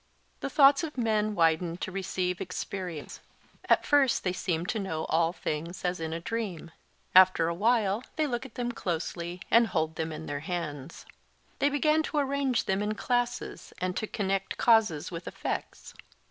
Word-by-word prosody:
The -, -, -3 dB
thoughts 280 Hz, +1 st, +6 dB
of 305 Hz, -4 st, -5 dB
men 215 Hz, -3 st, +1 dB
widened 165 Hz, 0 st, +2 dB
to -, -, -3 dB
receive 185 Hz, -1 st, -2 dB
experience; 180 Hz, -4 st, -5 dB, 0.5 s
at -, -, +4 dB
first 285 Hz, -3 st, +3 dB
they 180 Hz, -, 0 dB
seemed 175 Hz, -2 st, -2 dB
to 225 Hz, -, -1 dB
know 160 Hz, -5 st, -3 dB
all 165 Hz, +1 st, +3 dB
things 170 Hz, +1 st, -4 dB
as 180 Hz, 0 st, 0 dB
in 160 Hz, -1 st, -3 dB
a 165 Hz, -, -3 dB
dream: 185 Hz, -4 st, -4 dB, 0.4 s
after 185 Hz, -3 st, +7 dB
a 170 Hz, -, 0 dB
while 215 Hz, +2 st, +2 dB
they 310 Hz, -1 st, +1 dB
look 240 Hz, -4 st, -2 dB
at 265 Hz, -4 st, -11 dB
them 240 Hz, -1 st, -2 dB
closely 175 Hz, -2 st, -4 dB
and 230 Hz, 0 st, +6 dB
hold 160 Hz, -4 st, -1 dB
them 160 Hz, 0 st, -2 dB
in 155 Hz, 0 st, -6 dB
their 145 Hz, -1 st, -3 dB
hands. 155 Hz, -3 st, -5 dB, 0.5 s
They 285 Hz, -, +3 dB
begin 305 Hz, +2 st, +2 dB
to 315 Hz, -, -3 dB
arrange 275 Hz, -3 st, +1 dB
them 190 Hz, 0 st, 0 dB
in 210 Hz, +1 st, -1 dB
classes 245 Hz, +2 st, -2 dB
and 185 Hz, 0 st, -2 dB
to 215 Hz, -, -2 dB
connect 195 Hz, -2 st, -2 dB
causes 215 Hz, -10 st, +3 dB
with 170 Hz, 0 st, -7 dB
effects. -, -, -5 dB
190 Hz, 175 wpm, -29 LUFS, 170-235 Hz, 0.5 s, after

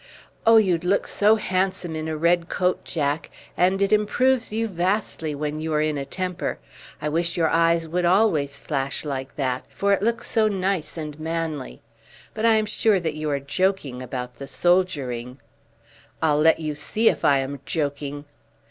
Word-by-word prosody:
"Oh, 225 Hz, 0 st, +8 dB
you'd 180 Hz, -6 st, +3 dB
look 190 Hz, +3 st, +1 dB
so 210 Hz, +2 st, +3 dB
handsome 185 Hz, -4 st, -1 dB
in 155 Hz, 0 st, -4 dB
a 160 Hz, -1 st, -3 dB
red 170 Hz, +1 st, +2 dB
coat, 180 Hz, -1 st, 0 dB
Jack, 150 Hz, -2 st, -2 dB, 0.3 s
and 190 Hz, +2 st, +2 dB
it 200 Hz, -, +2 dB
improves 245 Hz, +4 st, +2 dB
you 225 Hz, +1 st, -1 dB
vastly 180 Hz, -4 st, -1 dB
when 150 Hz, +1 st, -3 dB
you 160 Hz, 0 st, -3 dB
are 150 Hz, -, +2 dB
in 155 Hz, -1 st, 0 dB
a 140 Hz, -1 st, -3 dB
temper. 180 Hz, +4 st, -3 dB, 0.4 s
I 150 Hz, -, -3 dB
wish 165 Hz, +3 st, -1 dB
your 165 Hz, -2 st, +3 dB
eyes 165 Hz, 0 st, +2 dB
would 175 Hz, +3 st, -1 dB
always 170 Hz, -7 st, +2 dB
flash 140 Hz, 0 st, -3 dB
like 135 Hz, -2 st, -4 dB
that, 130 Hz, -3 st, -1 dB
for 200 Hz, 0 st, +1 dB
it 195 Hz, -, +1 dB
looks 230 Hz, +2 st, 0 dB
so 220 Hz, -1 st, +3 dB
nice 190 Hz, -5 st, -1 dB
and 150 Hz, -1 st, -6 dB
manly. 160 Hz, -3 st, -4 dB, 0.5 s
But 225 Hz, +1 st, +1 dB
I 225 Hz, -, +5 dB
am 215 Hz, 0 st, +2 dB
sure 215 Hz, -1 st, +2 dB
that 160 Hz, -3 st, -2 dB
you 155 Hz, 0 st, -3 dB
are 140 Hz, -1 st, 0 dB
joking 140 Hz, -3 st, -1 dB
about 125 Hz, -1 st, -6 dB
the 140 Hz, -, -7 dB
soldiering." 135 Hz, -7 st, 0 dB, 0.8 s
"I'll 150 Hz, -2 st, +2 dB
let 160 Hz, +2 st, +4 dB
you 155 Hz, -2 st, -3 dB
see 215 Hz, +9 st, -1 dB
if -, -, +2 dB
I 140 Hz, -, +5 dB
am 135 Hz, +1 st, -3 dB
joking." 145 Hz, -2 st, -3 dB
165 Hz, 180 wpm, -24 LUFS, 145-190 Hz, 0.8 s, Oh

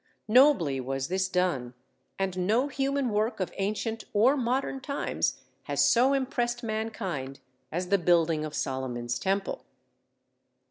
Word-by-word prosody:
Nobly 215 Hz, -, +5 dB
was 135 Hz, +3 st, -3 dB
this 185 Hz, +1 st, 0 dB
done, 160 Hz, -10 st, 0 dB, 0.4 s
and 185 Hz, -2 st, -1 dB
no 245 Hz, +7 st, +2 dB
human 275 Hz, -1 st, 0 dB
work 215 Hz, +2 st, 0 dB
of 185 Hz, -, -2 dB
ancient 215 Hz, +3 st, -2 dB
or 235 Hz, +7 st, +5 dB
modern 265 Hz, +1 st, -1 dB
times 280 Hz, +2 st, -2 dB, 0.2 s
has -, -, +2 dB
so 255 Hz, +4 st, +4 dB
impressed 245 Hz, -3 st, -1 dB
mankind 210 Hz, -, -4 dB, 0.3 s
as 180 Hz, +2 st, -3 dB
the 200 Hz, 0 st, +3 dB
building 165 Hz, -2 st, +3 dB
of 155 Hz, -1 st, -5 dB
Solomon's 125 Hz, -3 st, -2 dB
Temple. 195 Hz, +1 st, -1 dB
195 Hz, 130 wpm, -28 LUFS, 160-240 Hz, 0.4 s, Nobly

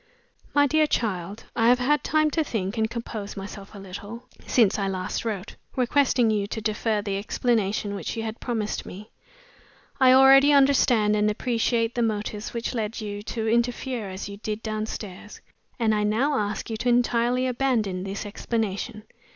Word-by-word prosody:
"MY 290 Hz, 0 st, +6 dB
DEAR 310 Hz, +2 st, +3 dB
CHILD 205 Hz, -, -2 dB
I 225 Hz, -, +3 dB
have 245 Hz, +1 st, +6 dB
had 270 Hz, +3 st, +1 dB
time 310 Hz, -1 st, +2 dB
to 320 Hz, -, +1 dB
think 210 Hz, -7 st, -3 dB
and 220 Hz, -1 st, 0 dB
compose 225 Hz, -4 st, -6 dB
myself 200 Hz, +1 st, -8 dB
a -, -, -8 dB
little, 200 Hz, +4 st, -8 dB, 0.2 s
since 215 Hz, -4 st, +3 dB
I 195 Hz, -, 0 dB
last 185 Hz, 0 st, -3 dB
wrote, 210 Hz, -3 st, -4 dB, 0.2 s
requesting 250 Hz, -2 st, +3 dB
you 205 Hz, -2 st, 0 dB
to 220 Hz, -, -4 dB
defer 215 Hz, 0 st, -1 dB
the 200 Hz, -2 st, -2 dB
explanation 210 Hz, -2 st, 0 dB
which 200 Hz, -, -4 dB
you 225 Hz, -, -2 dB
had 220 Hz, 0 st, -5 dB
promised 220 Hz, -4 st, -2 dB
me. 210 Hz, +4 st, -10 dB, 0.9 s
I 260 Hz, -1 st, +7 dB
already 270 Hz, +2 st, +7 dB
understand 255 Hz, -6 st, +4 dB
(and 210 Hz, 0 st, +2 dB
appreciate) 230 Hz, +1 st, 0 dB
the 240 Hz, -, -1 dB
motives 215 Hz, -1 st, -2 dB
which 235 Hz, +1 st, -3 dB
led 225 Hz, -1 st, -3 dB
you 205 Hz, -2 st, -5 dB
to 225 Hz, +1 st, -4 dB
interfere 235 Hz, -1 st, 0 dB
as 190 Hz, +1 st, -6 dB
you 200 Hz, 0 st, -8 dB
did 215 Hz, +1 st, -5 dB
downstairs, 215 Hz, -2 st, -5 dB, 0.4 s
and 225 Hz, -4 st, +2 dB
I 210 Hz, -, +1 dB
now 240 Hz, +8 st, +1 dB
ask 210 Hz, -1 st, -2 dB
you 220 Hz, -, -2 dB
to 240 Hz, +3 st, 0 dB
entirely 245 Hz, +1 st, +2 dB
abandon 235 Hz, -8 st, 0 dB
the 195 Hz, +1 st, -5 dB
explanation. 215 Hz, 0 st, -3 dB
220 Hz, 170 wpm, -25 LUFS, 205-245 Hz, 0.9 s, I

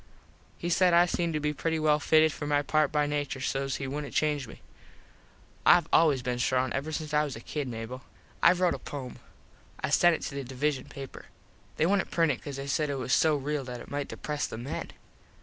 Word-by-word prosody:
He 175 Hz, -, -3 dB
said 180 Hz, 0 st, +4 dB
I 175 Hz, +1 st, +7 dB
seemed 170 Hz, -2 st, -1 dB
to -, -, +1 dB
be 150 Hz, 0 st, -1 dB
pretty 160 Hz, +3 st, -1 dB
well 155 Hz, -1 st, +3 dB
fitted 155 Hz, 0 st, +4 dB
for 145 Hz, -, -5 dB
my 145 Hz, 0 st, +2 dB
part 155 Hz, 0 st, +2 dB
by 150 Hz, -1 st, +2 dB
nature 145 Hz, -2 st, -2 dB
so 135 Hz, +1 st, -1 dB
he 135 Hz, 0 st, -3 dB
wouldnt 145 Hz, +2 st, -5 dB
change 150 Hz, -4 st, +1 dB
me. -, -, -13 dB, 1.0 s
Ive 170 Hz, -2 st, +6 dB
always 145 Hz, -6 st, +4 dB
been 125 Hz, -1 st, -2 dB
strong 130 Hz, 0 st, +1 dB
ever 140 Hz, +4 st, -3 dB
since 155 Hz, -1 st, -4 dB
I 150 Hz, 0 st, +4 dB
was 145 Hz, -4 st, -4 dB
a -, -, -7 dB
kid, 145 Hz, +4 st, -4 dB
Mable. 120 Hz, +2 st, -6 dB, 0.4 s
Ive 175 Hz, +1 st, +5 dB
rote 180 Hz, -2 st, +3 dB
a -, -, -5 dB
pome. 130 Hz, -4 st, -7 dB, 0.6 s
I -, -, -2 dB
sent 175 Hz, -1 st, +5 dB
it -, -, -7 dB
to -, -, -4 dB
the 140 Hz, 0 st, -4 dB
Divisun 135 Hz, +2 st, -2 dB
paper. 135 Hz, -1 st, -9 dB, 0.5 s
They 155 Hz, -, +3 dB
wouldnt 195 Hz, +1 st, +1 dB
print 165 Hz, -3 st, +2 dB
it 130 Hz, -, -4 dB
cause 145 Hz, -2 st, -6 dB
they 135 Hz, 0 st, -5 dB
said 150 Hz, +2 st, 0 dB
it 140 Hz, -, -1 dB
was 130 Hz, -1 st, -2 dB
so 160 Hz, -1 st, +4 dB
real 145 Hz, 0 st, -2 dB
that 125 Hz, -1 st, -6 dB
it -, -, -11 dB
might 145 Hz, 0 st, -2 dB
depres 150 Hz, -1 st, -3 dB
the -, -, -6 dB
men. 120 Hz, +4 st, -5 dB
145 Hz, 225 wpm, -28 LUFS, 135-155 Hz, 1.0 s, I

